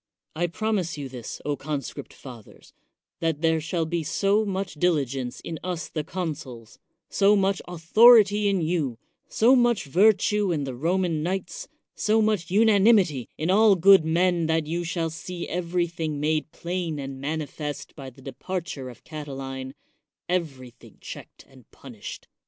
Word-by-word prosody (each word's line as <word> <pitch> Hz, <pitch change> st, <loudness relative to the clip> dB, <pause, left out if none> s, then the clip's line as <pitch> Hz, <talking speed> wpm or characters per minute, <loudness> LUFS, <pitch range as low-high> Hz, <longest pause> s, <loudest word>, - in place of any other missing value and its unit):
I 175 Hz, +2 st, 0 dB
promise 190 Hz, -2 st, -2 dB
you, 140 Hz, -2 st, -5 dB
this, 125 Hz, -4 st, -8 dB, 0.2 s
conscript 145 Hz, -3 st, -5 dB
fathers, 120 Hz, -6 st, -13 dB, 0.5 s
that 160 Hz, -2 st, -1 dB
there 160 Hz, -1 st, +2 dB
shall 165 Hz, +1 st, -2 dB
be 170 Hz, +1 st, -2 dB
so 195 Hz, +7 st, +1 dB
much 195 Hz, -3 st, -3 dB
diligence 140 Hz, -6 st, -1 dB
in 165 Hz, -1 st, -6 dB
us 175 Hz, -2 st, -4 dB
the 155 Hz, -, -3 dB
consuls, 145 Hz, -, -6 dB, 0.3 s
so 200 Hz, +1 st, +3 dB
much 195 Hz, -1 st, +1 dB
author 195 Hz, +8 st, +7 dB
ity 205 Hz, 0 st, +2 dB
in 195 Hz, -3 st, +1 dB
you, 155 Hz, -7 st, -1 dB, 0.3 s
so 245 Hz, +4 st, +4 dB
much 240 Hz, -3 st, +2 dB
virtue 205 Hz, +4 st, +3 dB
in 150 Hz, -4 st, -1 dB
the 135 Hz, -2 st, -4 dB
Roman 165 Hz, +4 st, 0 dB
knights, 195 Hz, -, -4 dB, 0.3 s
so 215 Hz, +1 st, +1 dB
much 215 Hz, -6 st, +1 dB
unanimity 200 Hz, -, +4 dB
in 160 Hz, +4 st, 0 dB
all 210 Hz, +1 st, +6 dB
good 190 Hz, 0 st, +6 dB
men 170 Hz, +1 st, +1 dB
that 160 Hz, -1 st, +1 dB
you 170 Hz, +3 st, -2 dB
shall 165 Hz, -1 st, -2 dB
see 170 Hz, +2 st, -6 dB
everything 170 Hz, -3 st, -2 dB
made 155 Hz, +1 st, -1 dB
plain 170 Hz, -2 st, -4 dB
and 135 Hz, -1 st, -6 dB
manifest 150 Hz, 0 st, -5 dB
by 135 Hz, -3 st, -8 dB
the 130 Hz, +1 st, -18 dB
departure 145 Hz, -1 st, -5 dB
of 120 Hz, -, -14 dB
Catiline, 135 Hz, -3 st, -7 dB, 0.3 s
— 150 Hz, -1 st, -64 dB
everything 140 Hz, -9 st, -5 dB
checked -, -, -11 dB
and 130 Hz, -4 st, -19 dB
punished. 120 Hz, -6 st, -10 dB
165 Hz, 150 wpm, -25 LUFS, 145-190 Hz, 0.5 s, author